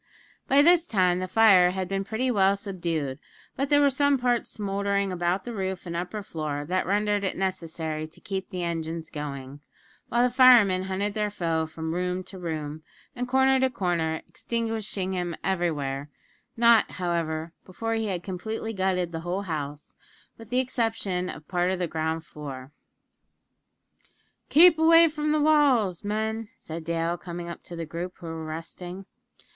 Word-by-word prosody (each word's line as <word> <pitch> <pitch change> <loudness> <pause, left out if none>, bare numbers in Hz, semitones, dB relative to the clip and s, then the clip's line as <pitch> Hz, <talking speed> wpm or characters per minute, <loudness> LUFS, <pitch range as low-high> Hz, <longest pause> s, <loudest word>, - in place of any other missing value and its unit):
By 280 +1 +5
this 340 +1 +5
time 180 -4 +2
the 185 - -3
fire 190 -3 +6
had 185 0 -3
been 195 +1 -2
pretty 240 +5 -1
well 195 -3 +4
subdued; 170 -9 -3 0.4
but 275 +1 -1
there 290 -1 +5
were 285 -1 +5
some 285 +1 +3
parts 245 -2 0
smouldering 200 -1 -1
about 180 +1 -1
the 240 - -5
roof 190 -3 -3
and 170 -1 -5
upper 180 +5 -4
floor, 155 -6 -4
that 185 +4 -1
rendered 205 +1 +1
it 190 - -2
necessary 160 -4 -3
to 155 - -15
keep 190 -1 -5
the 180 -3 -4
engines 165 -1 -4
going, 140 -2 -6 0.5
while 240 +1 +3
the 250 -1 +1
firemen 230 -8 +6
hunted 195 +2 -2
their 210 -1 0
foe 165 -5 -1
from 160 0 -5
room 180 +1 -1
to 190 0 -11
room, 155 -3 -4 0.3
and 245 0 -3
corner 265 +1 +4
to 265 0 +3
corner 170 -8 -1
extinguishing 220 -5 -3
him 175 -2 -2
everywhere; 150 -7 -1 0.5
not, 235 -1 +5
however, 165 -2 -2
before 225 +5 -4
he 225 -1 -1
had 180 -3 -3
completely 220 +4 -4
gutted 185 -3 0
the 165 - -4
whole 175 +4 -3
house, 150 -5 -5 0.4
with 225 -2 -13
the 250 - 0
exception 225 -8 -1
of 150 0 -9
part 180 0 +1
of 190 - 0
the 180 - -1
ground 160 0 -2
floor. 135 -3 -8 1.8
"Keep 325 +1 +7
away 330 +1 +7
from 300 -1 -1
the 305 - +2
walls, 275 - +3
men," 220 +1 -2
said 160 +1 -7
Dale, 170 +1 -1
coming 175 -1 -6
up 170 - -7
to 175 - -8
the 165 -1 -4
group, 170 +3 -6
who 175 - -12
were 165 -1 -5
resting. 175 +4 -7
185 Hz, 170 wpm, -26 LUFS, 165-220 Hz, 1.8 s, Keep